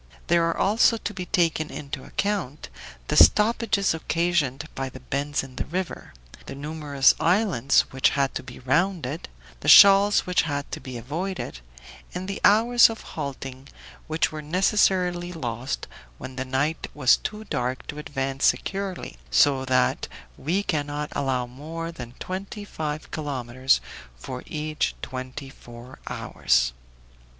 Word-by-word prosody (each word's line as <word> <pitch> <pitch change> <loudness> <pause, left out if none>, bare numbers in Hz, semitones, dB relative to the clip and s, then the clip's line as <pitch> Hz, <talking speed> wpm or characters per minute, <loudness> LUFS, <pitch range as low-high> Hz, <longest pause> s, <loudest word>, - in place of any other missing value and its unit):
There 170 0 +3
are 165 - -2
also 225 +3 +3
to 210 - -5
be 180 -2 -6
taken 165 -5 +1
into 140 -1 -6
account 195 -9 -3 0.4
the - - -1
stoppages 215 -3 +4
occasioned 160 -3 0
by 135 0 -4
the 130 - -11
bends 140 +3 -2
in 130 -1 -12
the - - -2
river, 180 +2 -5 0.3
the - - -6
numerous 145 -2 +2
islands 175 - +3
which 130 0 +3
had 140 -1 0
to - - -3
be 125 -1 -11
rounded, 155 +2 -1 0.3
the - - -7
shoals 200 +1 +8
which 180 0 +2
had 145 -2 -3
to - - -4
be 130 -2 -7
avoided, 155 - -4 0.6
and 185 +1 -4
the 195 - -4
hours 235 +4 +6
of 225 - -6
halting, 135 -2 -6 0.4
which 155 +1 0
were 155 -1 -6
necessarily 180 +1 +1
lost 125 -5 -4 0.3
when 130 - -8
the 130 0 -3
night 140 +5 -1
was 130 -4 +5
too 215 0 -5
dark 125 - -3
to 150 - -7
advance 135 -2 -2
securely, 195 -2 -1
so 135 -2 +4
that 130 -1 +1 0.3
we 175 - -1
cannot 145 -3 -2
allow 130 -3 -1
more 160 +7 -7
than 125 -7 -9
twenty 195 +2 -6
five 155 -5 -5
kilometers 130 -3 0 0.4
for 125 - -7
each 155 0 -2
twenty 130 +1 -6
four 120 +1 -13
hours. - - +1
150 Hz, 140 wpm, -25 LUFS, 130-180 Hz, 0.6 s, shoals